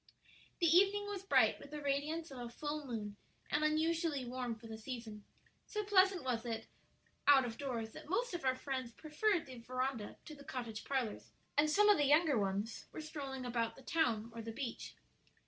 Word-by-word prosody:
The 345 - +3
evening 400 +2 +5
was 410 -2 -4
bright 395 - +4
with 280 - -11
the 300 +1 -5
radiance 290 +3 -1
of 260 - -7
a 240 -1 -5
full 295 +3 -4
moon 210 -4 -4 0.3
and 295 +1 +2
unusually 315 -2 +1
warm 245 -1 -3
for 225 +1 -15
the 225 -1 -6
season; 225 -3 -7 0.4
so 425 0 -2
pleasant 385 -3 +4
was 245 -3 -1
it 225 -2 -3 0.6
out 275 -3 +8
of 230 -2 -4
doors 235 -6 -3
that - - -11
most 470 +5 0
of 345 - -3
our 260 -1 +3
friends 260 -3 -4
preferred 330 - 0
the 255 -3 -9
veranda 255 -2 -3
to 310 - -8
the 280 -1 -12
cottage 235 -5 -5
parlors, 260 -6 -2 0.2
and 295 +1 +4
some 415 +6 +5
of 415 -6 +6
the 290 - +4
younger 300 0 +5
ones 200 +3 -2
were - - -7
strolling 280 -4 -5
about 235 -2 -1
the 265 - -14
town 235 -8 +1
or 230 - -5
the 225 0 -5
beach. 235 0 -5
270 Hz, 195 wpm, -36 LUFS, 235-315 Hz, 0.6 s, out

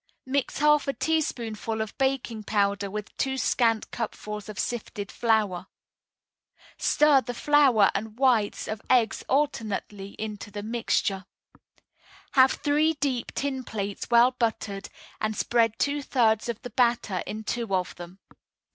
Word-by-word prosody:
Mix 270 +1 -1
half 300 0 +4
a 275 - 0
teaspoonful 230 -9 -2
of 220 -1 -4
baking 265 -4 0
powder 200 -1 0
with 210 +1 -6
two 265 0 -1
scant 230 -4 +1
cupfuls 210 -2 -5
of 210 - -8
sifted 210 -4 -4
flour. 215 -6 +1 1.1
Stir 295 -3 +4
the 245 -1 -6
flour 270 -8 +4
and 215 +2 -4
whites 245 -6 +2
of 215 -1 -4
eggs 235 -4 +3
alternately 215 -8 -1
into 210 -1 -6
the 205 0 -6
mixture. 215 -4 -1 1.1
Have 260 -1 +5
three 300 +2 +2
deep 275 -5 -2
tin 265 -2 -2
plates 200 -4 -5
well 240 +1 +6
buttered, 220 -5 -2 0.3
and 215 0 -2
spread 230 -2 +2
two 285 +1 0
thirds 230 -5 +1
of 230 -2 -3
the 245 - -7
batter 235 -6 +1
in 215 +1 -5
two 230 -1 -3
of 185 -1 -2
them. 175 +1 -10
225 Hz, 140 wpm, -26 LUFS, 210-260 Hz, 1.1 s, well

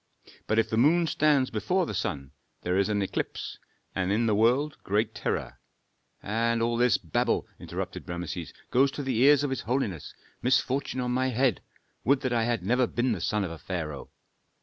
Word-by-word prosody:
But 110 - +1
if 115 - +3
the 110 - +1
moon 165 +5 +4
stands 145 -4 +2
before 175 - +1
the - - -5
sun 70 -2 -3 0.3
there 90 +1 0
is 100 +1 +2
an 105 -1 +1
eclipse, 95 - -4 0.3
and 95 0 -1
in 115 +3 +2
the 110 - +2
world 125 +8 +2
great 105 +2 0
terror - - -3 0.4
'" - - -41
"And 115 +2 +1
all 115 +1 +1
this 120 -3 +4
babble," 80 -4 0
interrupted - - -6
Rameses, 85 -1 -4 0.2
"goes 135 +3 +4
to 145 - -4
the 130 -4 -1
ears 145 +2 +6
of 145 - -1
his 135 - -2
holiness. 110 - -2 0.3
Misfortune 130 +1 +1
on 125 0 -1
my 130 +1 +1
head! 125 -2 +1 0.4
Would 135 +1 +3
that 130 -3 -1
I 115 -1 +2
had 115 -5 -1
never 125 +5 +2
been 120 +2 0
the 100 -7 -2
son 105 -1 0
of 90 - -4
a 85 - -8
pharaoh!" 80 -7 -5
115 Hz, 195 wpm, -28 LUFS, 100-130 Hz, 0.4 s, ears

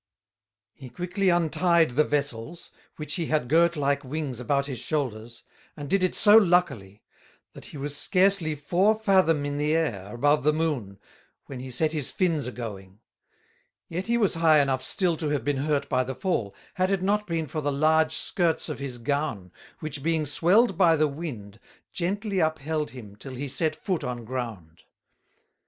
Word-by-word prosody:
He 130 -2 -11
quickly 180 - -1
untied 170 -2 +2
the 145 +5 +3
Vessels, 145 +2 -3 0.2
which 150 -1 -5
he 170 -4 -2
had 150 -6 0
girt 170 +4 +3
like 140 -1 0
Wings 135 -2 -4
about 140 +3 0
his 135 -5 -5
Shoulders, 120 -5 -3 0.3
and 145 -1 -6
did 195 +6 +1
it 185 - +1
so 210 0 +6
luckily, 170 - +1 0.5
that - - -11
he - - -10
was 145 +1 -4
scarcely 185 -2 +2
Four 180 +9 +2
Fathom 185 -8 +2
in 145 0 -3
the 150 +2 +1
Air 105 - -2
above 145 +5 +2
the 150 +3 +2
Moon, 145 -12 -2 0.5
when 135 -2 -8
he 130 +1 -7
set 155 +5 0
his 150 -4 -2
Fins 165 -7 0
a - - -4
going; 100 -5 -8 0.9
yet 180 +5 -4
he 235 +1 +2
was 210 -5 +2
high 160 -2 +4
enough 135 -2 +1
still 175 +5 0
to 155 -2 -2
have 145 -5 -1
been 145 +1 0
hurt 145 +1 -1
by 130 - +1
the 130 +1 -5
fall, 175 - -2 0.2
had 185 0 0
it 195 -2 0
not 210 +2 0
been 165 -2 -2
for 155 +2 -4
the 145 0 -1
large 155 +3 +2
skirts 170 -4 0
of - - -5
his 135 -3 -5
Gown, 120 - -3 0.3
which 155 -2 -5
being 160 0 0
swelled 185 - +3
by 170 -3 +5
the 155 0 +2
Wind, 125 -9 -7 0.3
gently 200 +3 -2
upheld 155 -1 -1
him 110 -6 -11
till 130 +5 -9
he 140 +3 -4
set 155 +3 0
Foot 180 +2 -3
on 120 -2 -5
ground. 110 -10 -6
150 Hz, 180 wpm, -26 LUFS, 130-170 Hz, 0.9 s, so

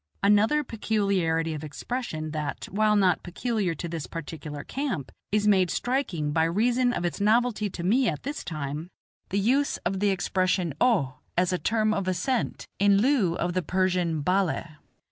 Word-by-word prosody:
Another 210 +9 +4
peculiarity 195 - 0
of 155 0 -6
expression, 155 - -4
that, 150 -2 -4
while 210 +2 +3
not 185 -4 +3
peculiar 195 -1 -2
to 170 - -5
this 165 -3 -5
particular 150 -3 -7
camp, 260 - -3 0.2
is 210 0 +2
made 190 -3 +4
striking 195 - -1
by 160 +2 +2
reason 240 +8 +2
of 175 - -2
its 175 +1 -3
novelty 215 0 +2
to 175 - -6
me 235 +7 +3
at 150 - -5
this 285 +3 -4
time, 155 -1 -4 0.4
the 195 - -1
use 260 +8 +2
of 190 +2 0
the 205 +1 +2
expression 185 -3 0
"O" 160 - +2 0.2
as 180 +1 +2
a 180 - 0
term 215 -1 +1
of 195 -3 -2
assent, 235 +7 -1
in 200 0 +5
lieu 215 -7 +3
of 175 0 -1
the 185 - +1
Persian 180 -4 0
"balli." 185 0 +1
190 Hz, 165 wpm, -26 LUFS, 165-220 Hz, 0.4 s, in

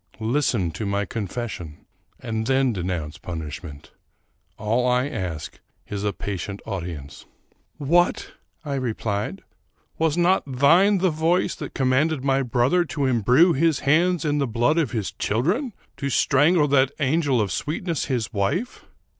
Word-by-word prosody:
Listen 115 - 0
to 110 - -6
my 100 +1 0
con 105 -2 -4
fession, 90 -9 -6 0.3
and 110 0 -3
then 130 -2 +2
denounce 85 -5 -4
punishment. 80 -3 -7 0.7
All 115 +4 0
I 125 +2 +2
ask 90 - -5 0.3
is 100 -1 -4
a 105 - +1
patient 100 +2 -5
audience." 85 -8 -6 0.3
" - - -46 0.2
What! 170 +5 +1 0.2
" - - -38
I 145 - -3
replied; 110 -6 -3 0.3
" - - -41
was 160 0 +1
not 175 +2 +3
thine 170 +10 +5
the 185 -1 +2
voice 165 +3 +1
that 150 - -8
com 130 -1 +1
manded 145 +1 +1
my 135 0 +2
brother 125 +7 +2
to 150 -3 -2
imbrue 130 - +4
his 160 +1 +2
hands 170 +3 +2
in 145 -1 +1
the 140 - +1
blood 120 +8 +2
of 150 -7 +1
his 105 -7 -3
children? 170 - -1
— - - -40
to 140 -1 -2
strangle 150 +5 +3
that 135 -1 +4
angel 145 -2 +2
of 105 -4 0
sweetness, 155 - -2
his 120 -4 -2
wife? 115 - -2
130 Hz, 160 wpm, -23 LUFS, 100-155 Hz, 0.7 s, thine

